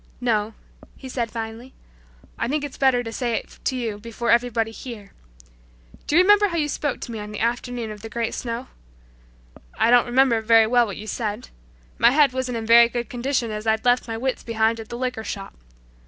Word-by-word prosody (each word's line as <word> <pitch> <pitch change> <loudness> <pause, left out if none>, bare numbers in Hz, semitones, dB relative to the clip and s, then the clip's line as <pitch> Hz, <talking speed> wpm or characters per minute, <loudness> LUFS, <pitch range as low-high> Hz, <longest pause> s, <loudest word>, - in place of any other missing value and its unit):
"No," 220 -3 0 0.4
he 265 - -10
said 240 -3 -2
finally, 225 +3 -7 0.6
"I - - -2
think 290 +3 -1
it's 290 - -6
better 260 -3 +2
to 225 - -6
say 240 -2 -1
it - - -6
to 260 - 0
you 225 -5 -3
before 230 +2 -2
everybody 235 -2 +2
here. 225 -4 -9 1.0
Do 295 - 0
you 355 - +7
remember 415 +1 +5
how 340 -3 -3
you 295 -2 0
spoke 290 -1 -2
to - - -6
me 225 - -5
on 210 0 -7
the 210 - -6
afternoon 235 0 -2
of 210 -1 -9
the 225 - -8
great 230 +1 -2
snow? 235 +1 -4 1.1
I 230 - +3
don't 245 0 +5
remember 245 -2 +3
very 225 0 +5
well 240 +1 +3
what 200 - -6
you 215 - -8
said. 215 +1 -4 0.5
My 235 - +7
head 280 0 +4
wasn't 255 -2 -2
in 225 - -4
very 235 +1 +7
good 240 +1 -4
condition 245 -2 -1
as 215 +1 -5
I'd 220 +1 +1
left 245 0 +3
my 225 -1 -4
wits 260 +2 -2
behind 225 0 0
at 220 - -9
the 235 - -5
liquor 250 -3 -3
shop. 195 -2 -6
235 Hz, 210 wpm, -23 LUFS, 225-250 Hz, 1.1 s, you